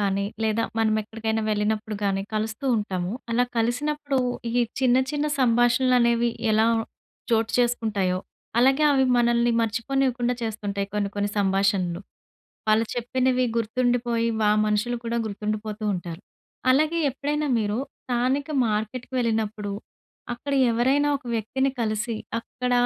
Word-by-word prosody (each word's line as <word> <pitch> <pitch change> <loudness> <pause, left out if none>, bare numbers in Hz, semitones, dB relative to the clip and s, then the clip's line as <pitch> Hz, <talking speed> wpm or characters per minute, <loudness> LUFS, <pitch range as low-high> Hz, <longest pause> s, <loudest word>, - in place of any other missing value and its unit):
కానీ, 200 0 0 0.2
లేదా 220 +1 +1 0.2
మనం 220 -1 +2
ఎక్కడికైనా 220 +1 -2
వెళ్ళినప్పుడు 215 0 -1
గానీ 195 -1 0
కలుస్తూ 215 +4 -2
ఉంటాము. 185 -3 -2 0.2
అలా 245 +2 +3
కలిసినప్పుడు 280 +4 0 0.3
ఈ - - -4 0.3
చిన్న 255 -1 +4
చిన్న 295 0 -1
సంభాషణలనేవి 240 -1 +3 0.2
ఎలా 220 +1 +4 0.7
చోటు 225 0 +2
చేసుకుంటాయో, 220 -6 +1 0.4
అలాగే 270 +4 +4
అవి 265 -1 +3
మనల్ని 240 0 +3
మర్చిపోనివ్వకుండా 245 +2 0
చేస్తుంటాయి 205 -3 -3
కొన్ని 205 -1 0
కొన్ని 205 0 0
సంభాషణలు. 195 -3 +1 0.7
వాళ్ళు 215 +1 +4
చెప్పినవి 255 +1 +1
గుర్తుండిపోయి 235 0 +1
వా 210 - +4 0.2
మనుషులు 215 +3 0
కూడా 230 0 -1
గుర్తుండిపోతూ 215 +1 -4
ఉంటారు. 175 -1 -6 0.5
అలాగే 310 +5 +3
ఎప్పుడైనా 295 +3 -2
మీరు 210 -1 -1 0.3
స్థానిక 255 +4 0 0.2
మార్కెట్‌కి 220 +5 -3
వెళ్ళినప్పుడు. 220 -3 -1 0.6
అక్కడ 260 +4 -5 0.2
ఎవరైనా 265 +5 +2
ఒక 275 - -15
వ్యక్తిని 265 +5 0
కలిసి 225 +1 -1 0.2
అక్కడ 250 +2 -4
230 Hz, 120 wpm, -25 LUFS, 210-250 Hz, 0.7 s, చిన్న